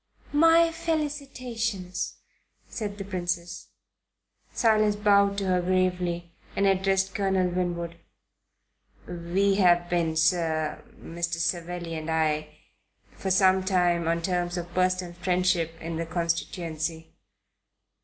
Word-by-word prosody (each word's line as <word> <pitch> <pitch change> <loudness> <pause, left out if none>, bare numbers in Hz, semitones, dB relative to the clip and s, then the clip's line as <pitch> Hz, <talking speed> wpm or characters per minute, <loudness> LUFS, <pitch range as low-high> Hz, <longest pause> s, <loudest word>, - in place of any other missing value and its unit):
"' - - -26 0.2
"My 330 0 +5
felicitations," 255 - -3 0.5
said 205 -3 -5
the 200 - -5
Princess. 175 -2 -3 0.8
Silas 215 -2 +3
bowed 200 -1 +3
to 200 - -1
her 180 -1 +2
gravely 180 -1 0 0.2
and 200 - +2
addressed 195 0 +2
Colonel 190 -2 +1
Winwood. 175 -1 -2 1.1
"We 180 +3 0
have 175 -2 +4
been, 165 -2 +1
sir 160 -1 +1 0.2
Mr. 170 +1 -3
Savelli 170 0 -3
and 160 0 -5
I 155 -1 +1 0.6
for 190 - -5
some 190 0 +4
time 175 -3 +2
on 170 0 0
terms 175 0 -1
of 175 0 -6
personal 185 -1 0
friendship 175 -2 0
in 165 0 -5
the 165 0 -3
constituency." 165 -1 -3
180 Hz, 115 wpm, -27 LUFS, 170-195 Hz, 1.1 s, My